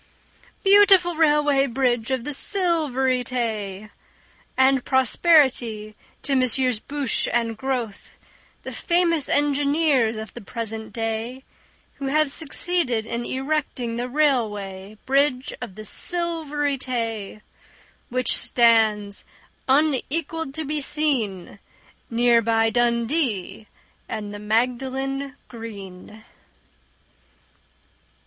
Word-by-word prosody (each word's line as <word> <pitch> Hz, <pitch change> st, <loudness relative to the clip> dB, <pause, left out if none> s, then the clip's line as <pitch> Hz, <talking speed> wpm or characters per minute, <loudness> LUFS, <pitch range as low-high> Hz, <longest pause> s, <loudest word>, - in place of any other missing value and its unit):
Beautiful 390 Hz, -3 st, +6 dB
Railway 295 Hz, -3 st, +3 dB
Bridge 245 Hz, -2 st, 0 dB
of 260 Hz, -3 st, -1 dB
the 295 Hz, -, -4 dB
Silvery 275 Hz, -8 st, +1 dB
Tay! 215 Hz, -5 st, -3 dB, 0.7 s
And 265 Hz, -1 st, +4 dB
prosperity 260 Hz, -6 st, +2 dB, 0.3 s
to 280 Hz, -, -1 dB
Messrs 255 Hz, -2 st, +1 dB
Bouche 280 Hz, +1 st, -1 dB
and 230 Hz, -1 st, 0 dB
Grothe, 245 Hz, -4 st, -4 dB, 0.5 s
The -, -, -6 dB
famous 340 Hz, -4 st, +1 dB
engineers 285 Hz, -4 st, +2 dB
of 220 Hz, -1 st, -7 dB
the -, -, -9 dB
present 220 Hz, +1 st, -6 dB
day, 225 Hz, +3 st, -4 dB, 0.5 s
Who 275 Hz, -, -4 dB
have 300 Hz, +1 st, +2 dB
succeeded 285 Hz, -6 st, -1 dB
in 235 Hz, +1 st, -4 dB
erecting 265 Hz, -4 st, -2 dB
The 245 Hz, +1 st, -3 dB
Railway 215 Hz, -8 st, -1 dB
Bridge 270 Hz, -1 st, +1 dB
of 230 Hz, -7 st, -7 dB
the 215 Hz, 0 st, -9 dB
Silvery 300 Hz, -, 0 dB
Tay, 225 Hz, -5 st, -4 dB, 0.7 s
Which 255 Hz, +1 st, +2 dB
stands 220 Hz, -4 st, +2 dB, 0.5 s
unequalled 300 Hz, +2 st, 0 dB
to 315 Hz, -1 st, -4 dB
be 300 Hz, +1 st, -2 dB
seen 240 Hz, -, -1 dB, 0.5 s
Near 235 Hz, 0 st, +3 dB
by 225 Hz, 0 st, +2 dB
Dundee 235 Hz, -, 0 dB, 0.4 s
and 210 Hz, -2 st, -5 dB
the 205 Hz, -, -7 dB
Magdalen 260 Hz, +5 st, -1 dB
Green. 215 Hz, -2 st, -10 dB
255 Hz, 100 wpm, -23 LUFS, 225-290 Hz, 0.7 s, Beautiful